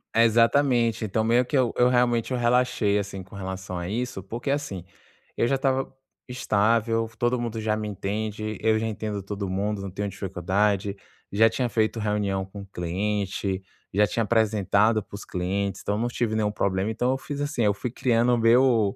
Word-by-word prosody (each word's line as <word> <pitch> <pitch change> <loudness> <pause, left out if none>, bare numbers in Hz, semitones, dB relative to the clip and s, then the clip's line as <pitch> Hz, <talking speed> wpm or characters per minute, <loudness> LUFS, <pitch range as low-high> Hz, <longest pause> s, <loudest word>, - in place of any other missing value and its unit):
Exatamente. 115 0 +3
Então 110 +2 0
meio 120 +3 +3
que 140 - 0
eu 125 -3 +2
eu 125 0 +5
realmente, 120 -1 +2
eu 125 - 0
relaxei, 120 -4 +2
assim, 100 -1 -4
com 95 - -14
relação 95 -1 -5
a 85 0 -4
isso, 120 -2 -3
porque 115 +7 -5
assim, 140 - -2 0.5
eu - - +2
já 135 - +2
estava 135 0 0 0.3
estável, 115 -1 +1
todo 120 +1 +1
mundo 115 -2 -3
já 110 0 +1
me 110 0 -3
entende, 110 +1 -3
eu 110 0 +3
já 110 - -2
entendo 105 -2 -4
todo 100 0 -4
mundo, 100 +2 -1
não 100 -1 -6
tenho 100 +2 -3
dificuldade. 100 +2 -1 0.4
Já 110 +3 +5
tinha 125 +2 -1
feito 110 +1 0
reunião 105 -3 -1
com 100 +1 -9
cliente, 95 +1 -2 0.3
já 105 +2 +4
tinha 115 +5 0
apresentado 110 -1 +2
para - - -26
os 100 - -8
clientes, 95 +2 -2
então 100 - -1
eu - - -2
não 120 - +1
tive 120 -2 -1
nenhum 105 -1 +1
problema. 100 0 0
Então 125 +3 0
eu 135 - 0
fiz 145 +1 -6
assim, 145 -4 -1
eu 105 -1 +3
fui 110 +4 -4
criando 120 -1 +2
o - - +3
meu 115 -3 +4
110 Hz, 190 wpm, -25 LUFS, 100-120 Hz, 0.5 s, eu